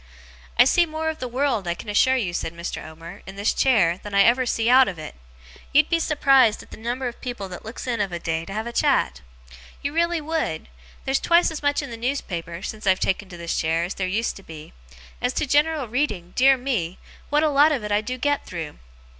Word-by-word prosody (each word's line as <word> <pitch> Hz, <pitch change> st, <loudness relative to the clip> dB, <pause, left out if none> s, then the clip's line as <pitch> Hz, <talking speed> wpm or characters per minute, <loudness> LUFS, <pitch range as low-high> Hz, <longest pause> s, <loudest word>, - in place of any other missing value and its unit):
'I 245 Hz, -, +8 dB
see 345 Hz, +6 st, +4 dB
more 315 Hz, 0 st, -2 dB
of 315 Hz, -, -11 dB
the 250 Hz, -, -3 dB
world, 245 Hz, -6 st, -1 dB
I 170 Hz, -, 0 dB
can 215 Hz, -, -11 dB
assure 235 Hz, +5 st, +3 dB
you,' 200 Hz, -9 st, -1 dB
said 170 Hz, -1 st, -3 dB
Mr. 170 Hz, +1 st, -5 dB
Omer, 165 Hz, +5 st, -11 dB
'in 190 Hz, -, -8 dB
this 200 Hz, +2 st, 0 dB
chair, 190 Hz, -10 st, +3 dB
than 205 Hz, -1 st, -6 dB
ever 235 Hz, +6 st, +5 dB
I -, -, 0 dB
see 230 Hz, -1 st, 0 dB
out 255 Hz, +1 st, +7 dB
of 180 Hz, -, -4 dB
it. 155 Hz, -, -8 dB, 0.6 s
You'd 300 Hz, +2 st, +5 dB
be 335 Hz, -, +3 dB
surprised 275 Hz, -8 st, +3 dB
at -, -, -20 dB
the -, -, -9 dB
number 240 Hz, +3 st, -3 dB
of 240 Hz, -, -8 dB
people 240 Hz, -6 st, -5 dB
that 180 Hz, -, -9 dB
looks 225 Hz, +2 st, -7 dB
in 235 Hz, -4 st, -1 dB
of 195 Hz, -2 st, -1 dB
a 175 Hz, -, -3 dB
day 165 Hz, -1 st, -2 dB
to -, -, -9 dB
have 220 Hz, +2 st, -3 dB
a 235 Hz, -, -6 dB
chat. -, -, +1 dB, 0.6 s
You 285 Hz, +1 st, -2 dB
really 340 Hz, +1 st, +1 dB
would! 310 Hz, -, -3 dB, 0.4 s
There's 270 Hz, 0 st, +1 dB
twice 340 Hz, 0 st, +3 dB
as 315 Hz, -, -6 dB
much 285 Hz, 0 st, +1 dB
in 275 Hz, -, -7 dB
the 230 Hz, -, -6 dB
newspaper, 185 Hz, -9 st, -4 dB
since 215 Hz, -1 st, -6 dB
I've 185 Hz, 0 st, +4 dB
taken 190 Hz, 0 st, -1 dB
to 175 Hz, -, -9 dB
this 170 Hz, 0 st, -3 dB
chair, 165 Hz, +1 st, 0 dB
as 175 Hz, -, -3 dB
there 185 Hz, -, -2 dB
used 220 Hz, +5 st, -1 dB
to 195 Hz, -, -13 dB
be. 155 Hz, -3 st, -11 dB, 0.5 s
As 250 Hz, +1 st, 0 dB
to -, -, 0 dB
general 295 Hz, 0 st, +2 dB
reading, 210 Hz, -8 st, -2 dB
dear 270 Hz, +1 st, +5 dB
me, 225 Hz, -10 st, -2 dB, 0.3 s
what 295 Hz, +1 st, +2 dB
a 310 Hz, -, +3 dB
lot 290 Hz, +2 st, +5 dB
of 270 Hz, -7 st, -1 dB
it 210 Hz, -, -4 dB
I 205 Hz, +1 st, +3 dB
do 250 Hz, +4 st, -4 dB
get 290 Hz, +3 st, 0 dB
through! 165 Hz, -5 st, -7 dB
235 Hz, 240 wpm, -23 LUFS, 185-275 Hz, 0.6 s, I